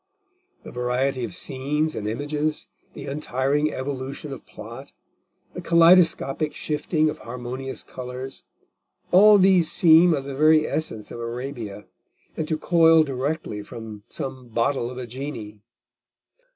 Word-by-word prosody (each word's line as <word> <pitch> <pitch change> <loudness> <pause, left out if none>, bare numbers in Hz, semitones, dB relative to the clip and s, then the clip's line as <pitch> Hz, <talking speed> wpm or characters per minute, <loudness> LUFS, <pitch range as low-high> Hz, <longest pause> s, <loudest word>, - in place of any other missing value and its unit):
The - - -10
variety 125 +1 -1
of - - -5
scenes 150 +3 -2
and 105 - -4
images, 145 +6 -2 0.3
the 140 - -7
untiring 145 +1 -1
evolution 135 +1 -5
of 135 - -11
plot, 115 +6 -10 0.6
the - - -6
kaleidoscopic 165 -3 +4
shifting 155 +1 -1
of 150 - -3
harmonious 125 +3 -6
colours, 130 +1 -7 0.7
all 205 +3 +8
these 185 -4 +4
seem 165 0 +6
of 140 - -4
the 140 0 -6
very 155 +2 +5
essence 110 -9 -3
of - - -7
Arabia, 115 -4 -6 0.5
and 155 - -3
to 155 - -1
coil 165 0 +5
directly 135 -4 -3
from 110 -1 -9
some 130 -2 -6
bottle 120 +2 0
of 125 - -9
a 130 - -5
genie. 120 -5 -7
135 Hz, 130 wpm, -24 LUFS, 125-155 Hz, 0.7 s, all